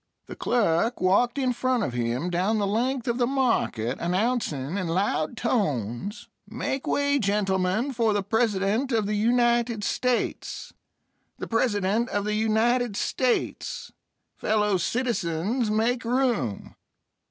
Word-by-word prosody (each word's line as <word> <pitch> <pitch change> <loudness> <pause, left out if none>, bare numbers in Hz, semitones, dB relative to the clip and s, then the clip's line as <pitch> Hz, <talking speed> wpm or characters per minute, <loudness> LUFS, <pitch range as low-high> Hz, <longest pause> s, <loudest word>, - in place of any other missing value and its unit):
The - - -9
clerk 230 0 +1
walked 220 +8 +2
in 260 -2 +1
front 255 -1 0
of 125 - -2
him 120 +8 -1
down 190 +6 +1
the 205 - +1
length 240 +5 -1
of 240 +1 0
the 240 - +3
market, 230 - 0
announcing 180 - -1
in 185 -3 -2
loud 175 +2 0
tones: 150 - -2 0.2
"Make 270 0 -3
way, 285 0 +2
gentlemen, 200 +3 0
for 230 -2 +2
the 205 -1 0
President 220 +3 +1
of 220 -3 +1
the 210 - -1
United 235 0 +2
States! 250 +3 -2 0.6
The - - -5
President 225 0 +1
of 205 0 -1
the 210 - -1
United 220 +1 +1
States! 255 -2 -1 0.5
Fellow 210 -2 +1
citizens, 220 0 -1
make 230 +3 +1
room!" 235 - -1
220 Hz, 130 wpm, -26 LUFS, 190-245 Hz, 0.6 s, the